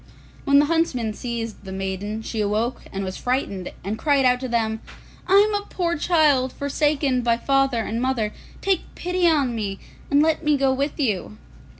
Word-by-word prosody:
When 280 -1 +5
the 290 - +6
huntsmen 290 -9 0
seized 230 -2 -5
the 190 - -8
maiden, 195 +3 -4
she 220 0 -3
awoke 215 +4 -1
and 195 0 -3
was 185 0 -4
frightened, 245 -8 -2
and 210 +4 -3
cried 285 -2 +3
out 250 0 +4
to 260 - -4
them, 220 -2 -1 0.5
'I 375 - +2 0.2
am - - -2
a 410 0 -2
poor 340 -2 -1
child, 295 -5 +3
forsaken 280 -2 0
by 235 -1 +2
father 270 -2 +1
and 230 +2 -3
mother; 245 -5 0 0.3
take 385 -3 +1
pity 360 0 +1
on 285 -7 +2
me, 205 -4 -3 0.3
and 285 +1 +4
let 320 +1 +1
me 300 -1 +3
go 270 -1 +2
with 280 +4 -2
you. 215 -5 -1
255 Hz, 185 wpm, -23 LUFS, 220-295 Hz, 0.5 s, the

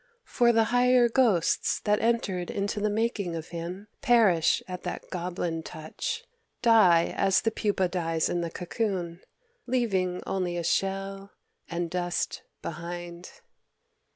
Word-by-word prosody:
For 240 -1 +3
the 225 -1 +4
higher 250 0 +5
ghosts 225 -8 +2
that 210 0 +2
entered 205 -6 0
into 200 +1 -2
the 210 +1 +1
making 205 -5 -1
of 160 -1 -6
him 175 +4 -6
perish 220 - +4
at 180 -1 -6
that 180 - -6
goblin 175 -2 -3
touch, 455 - -5 0.4
die 190 -8 +5
as 195 -1 +3
the 225 - +1
pupa 205 -3 0
dies 165 -3 -1
in 175 - -1
the 170 - -2
cocoon, 180 -1 -3 0.5
leaving 195 -8 0
only 180 -2 -2
a 170 - -2
shell 195 +2 -2 0.4
and 170 0 -2
dust 175 -1 -2 0.2
behind...." 170 +1 -6
185 Hz, 130 wpm, -27 LUFS, 175-220 Hz, 0.5 s, higher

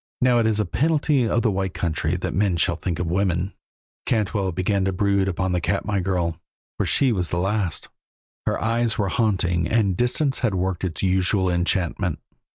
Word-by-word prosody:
Now 125 -2 +4
it 115 - +2
is 110 -1 +1
a 105 - +1
penalty 150 -4 +1
of 115 - +1
the 110 - +3
White 95 -1 -2
Country 80 0 -1
that 90 - -3
men 95 -3 +1
shall 85 +1 +1
think 85 -1 -3
of 90 - -2
women; 90 +1 0 0.5
Cantwell 100 -4 0
began 95 +3 0
to 95 - +1
brood 100 +1 +1
upon 95 0 -1
the 90 -1 0
Katmai 100 +2 -1
girl, 85 -3 -1 0.4
for - - +1
she 135 -3 +3
was 90 -6 0
the 85 - -2
last; 95 -1 -1 0.6
her - - +1
eyes 115 0 0
were 100 -2 0
haunting 90 -5 +1
and 100 -3 +2
distance 130 - 0
had 115 -6 0
worked 95 0 -1
its 90 -1 -2
usual 95 0 +2
enchantment. 90 -1 0
95 Hz, 185 wpm, -23 LUFS, 90-110 Hz, 0.6 s, Now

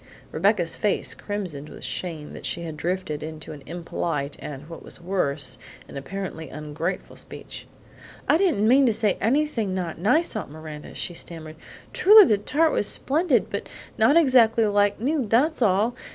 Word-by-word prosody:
Rebecca's 175 -1 +1
face 210 - 0
crimsoned 180 -9 -5
with - - -11
shame 160 -5 -5
that - - -10
she 170 - -3
had 160 -2 -6
drifted 165 -1 -3
into 155 0 -7
an 150 -2 -9
impolite 165 -3 -3
and, 145 0 -8
what 165 - -9
was - - -3
worse, 145 -8 -1 0.3
an - - -12
apparently 160 +1 -6
ungrateful 150 +5 -5
speech. - - -9 0.6
"I 295 - +5
didn't 330 - +2
mean 265 +3 +5
to 230 - +3
say 210 -2 +1
anything 230 -5 0
not 175 -4 -4
nice, 300 - +2
Aunt 215 - -4
Miranda," 155 0 -9
she 175 - -4
stammered. 160 -2 -5 0.4
"Truly 420 +1 +8
the 210 -2 +2
tart 305 +9 +2
was 205 - +1
splendid, 285 - +2
but 200 - -4 0.3
not 230 +9 +4
exactly 240 -7 +5
like 205 -1 +2
new, 270 +1 0
that's 270 +8 +2
all. 215 +2 +2
195 Hz, 165 wpm, -24 LUFS, 160-230 Hz, 0.6 s, Truly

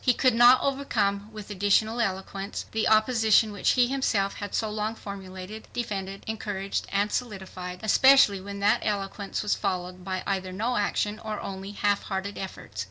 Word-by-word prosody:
He 250 -3 +4
could 255 -3 +3
not 240 +2 +7
overcome 215 -7 0
with 215 -1 -9
additional 205 +4 +2
eloquence 195 -1 -3
the 220 0 0
opposition 220 -1 +4
which 205 - +1
he 250 -1 +4
himself 230 -7 0
had 205 -1 -5
so 220 - 0
long 215 +1 -2
formulated, 195 +1 -8
defended, 195 -5 -4
encouraged 205 -3 -3
and 205 +1 +1
solidified, 190 -5 -5
especially 220 -3 +6
when 200 +1 -7
that 205 +1 +4
eloquence 200 -1 -3
was 210 - +1
followed 180 0 -3
by 185 0 -3
either 190 -2 -2
no 225 +7 -1
action 210 0 0
or 215 -1 -5
only 195 +1 -6
half 205 0 +1
hearted 195 +1 -4
efforts. 190 - -8
205 Hz, 165 wpm, -27 LUFS, 195-220 Hz, -, not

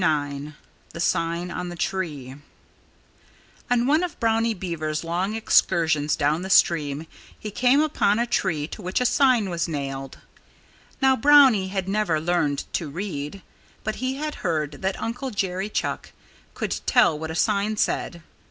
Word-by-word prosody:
IX 145 -2 -1 0.4
THE - - -7
SIGN 170 +1 0
ON 180 0 -4
THE 175 - -7
TREE 150 -8 -3 1.3
On 245 -1 +2
one 300 +5 +3
of 360 -3 -4
Brownie 225 0 +1
Beaver's 160 -4 -3
long 180 +5 -2
excursions 160 -8 +2
down 150 +2 +1
the 190 - -5
stream 150 -5 +3 0.3
he 210 - -7
came 255 +6 +3
upon 290 -9 +2
a 235 - +1
tree 155 -10 -1
to - - -8
which 185 0 -1
a 250 - 0
sign 250 -5 +3
was 170 0 -1
nailed. 135 -3 -5 0.9
Now, 265 0 +5
Brownie 260 -7 +6
had 190 -1 -3
never 195 -5 +1
learned 155 -3 0
to 160 - -2
read. 170 +1 -5 0.4
But 215 0 -3
he 255 +1 -2
had 300 +2 -4
heard 155 -4 -2
that 190 0 -2
Uncle 250 +4 -4
Jerry 195 -2 -2
Chuck - - -3 0.4
could - - -3
tell 195 -12 +4
what 160 0 -5
a 160 - -5
sign 210 +4 +1
said. 170 -4 -1
180 Hz, 155 wpm, -24 LUFS, 155-225 Hz, 1.3 s, Brownie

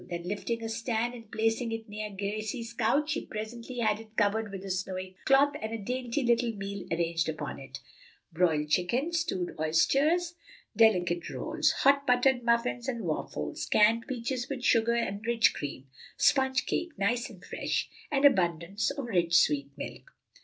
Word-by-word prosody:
Then 170 -1 -4
lifting 205 +5 -3
a - - -2
stand 230 +1 -1
and 230 -3 -11
placing 225 +2 0
it 225 0 -5
near 210 0 -5
Gracie's 215 +3 -4
couch, 285 +7 +1
she 310 - -1
presently 230 +3 -6
had 215 -1 +2
it 220 0 -14
covered 210 0 +1
with 195 0 -7
a 195 - -3
snowy 185 0 -4
cloth 275 +2 +5
and 220 - -4
a 225 - -2
dainty 250 +4 -2
little 235 0 +2
meal 200 -1 -6
arranged 165 -1 0
upon 150 -3 -5
it: 135 0 -9 0.6
broiled 160 -3 +2
chicken, 240 - +1
stewed 325 - -1
oysters, 285 - +2 0.4
delicate 180 -6 +3
rolls, 315 0 0
hot 280 +1 +4
buttered 250 +1 +4
muffins 235 +1 +1
and 235 -4 -3
waffles, 75 - -3
canned 225 +2 +4
peaches 250 0 -3
with 265 -3 -4
sugar 230 0 +4
and 205 -3 -2
rich 235 -1 +4
cream, 140 -2 -6 0.3
sponge 265 -2 +3
cake, 340 -3 -2
nice 235 +5 0
and - - -14
fresh, - - -2 0.2
and 280 0 +3
abundance 175 - +2
of 275 -2 -4
rich 175 -7 +1
sweet 140 -2 +2
milk. - - -8
225 Hz, 165 wpm, -29 LUFS, 185-250 Hz, 0.6 s, cloth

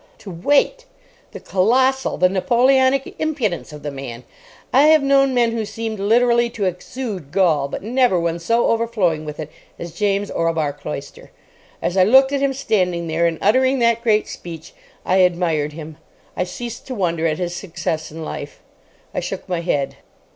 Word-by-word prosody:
To 195 - -10
wait! 290 - +1 0.5
The - - -8
colossal, 260 +7 +1
the 180 - +4
Napoleonic 260 +7 +2
impudence 260 - -2
of 150 -1 -11
the 145 - -4
man! 130 -3 -8 0.5
I 280 +4 +6
have 310 -2 +5
known 275 -1 +4
men 235 -2 +3
who 230 -1 -2
seemed 220 0 -5
literally 235 +3 +3
to 205 - 0
exude 185 - -5
gall, 165 -7 +2
but 140 - -6
never 240 -4 +2
one 170 0 -1
so 230 +8 +1
overflowing 210 -9 0
with 150 0 -7
it 155 -1 -6 0.3
as 170 - -7
James 200 +1 -1
Orlebar 165 -3 0
Cloyster. 145 -1 -8 0.5
As 180 - -1
I 185 - +6
looked 265 +7 +5
at 280 -1 0
him 275 -1 +2
standing 180 -10 0
there 165 +1 +1
and 165 -1 -2
uttering 260 +6 +3
that 235 -1 +2
great 215 -2 +2
speech, 165 -2 -9 0.3
I 185 - +2
admired 170 -5 +1
him. 155 -1 -9 0.4
I 180 - -1
ceased 235 +5 -7
to 260 - -5
wonder 170 -5 0
at 155 -1 -1
his 175 -1 -3
success 165 -4 -4
in 160 0 -7
life. - - -7 0.5
I - - -1
shook - - -5
my 175 -2 -2
head. 145 -5 -1
195 Hz, 175 wpm, -20 LUFS, 165-240 Hz, 0.5 s, I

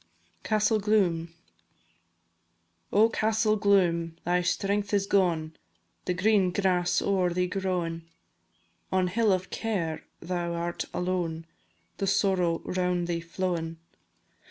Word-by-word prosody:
CASTELL 215 0 +2
GLOOM. 185 -6 +1 1.6
Oh, 215 +2 +5
Castell 220 -1 +1
Gloom! 175 -5 +2
thy 180 +1 +2
strength 200 +3 0
is 200 -1 +1
gone, 170 -6 +1 0.5
The 180 - 0
green 195 0 +3
grass 180 -2 +1
o'er 190 -3 +2
thee 180 +1 +1
growin'; 180 -3 -2 0.8
On 185 -1 +2
hill 220 +2 +2
of 185 -1 -1
Care 180 -8 -2 0.2
thou 170 -1 -3
art 170 0 -3
alone, 175 -3 -2 0.5
The 195 - -1
Sorrow 185 -4 +1
round 180 -1 0
thee 170 -1 -1
flowin'. 170 -1 -3
180 Hz, 110 wpm, -28 LUFS, 170-200 Hz, 1.6 s, Oh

